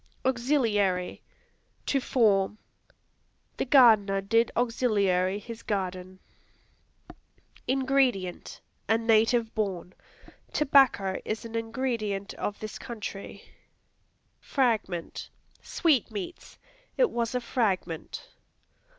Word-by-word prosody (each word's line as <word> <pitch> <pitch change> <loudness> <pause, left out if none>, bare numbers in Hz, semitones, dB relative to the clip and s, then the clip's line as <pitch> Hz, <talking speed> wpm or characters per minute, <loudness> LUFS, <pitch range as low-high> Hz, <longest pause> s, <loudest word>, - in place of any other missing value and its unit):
Auxiliary 230 -8 +1 0.6
To 275 - +1
form; 210 -6 +2 1.0
"The - - -1
gardener 220 -8 +5
did 225 +4 +2
auxiliary 200 -6 +1
his 230 +2 -9
garden." 185 -3 -4 1.5
Ingredient 260 -8 0 0.3
A 225 - +4
native 225 0 +2
born; 185 -4 -3 0.6
"Tobacco 270 -10 +3
is 220 +2 -4
an 230 - -8
ingredient 225 -4 -2
of 205 - -4
this 215 -1 -7
country." 210 -4 -7 1.0
Fragment 220 - -1 0.3
Sweetmeats; 255 - -1 0.4
"It - - +3
was 235 +1 -2
a - - +2
fragment." 205 - -2
220 Hz, 80 wpm, -27 LUFS, 195-250 Hz, 1.5 s, gardener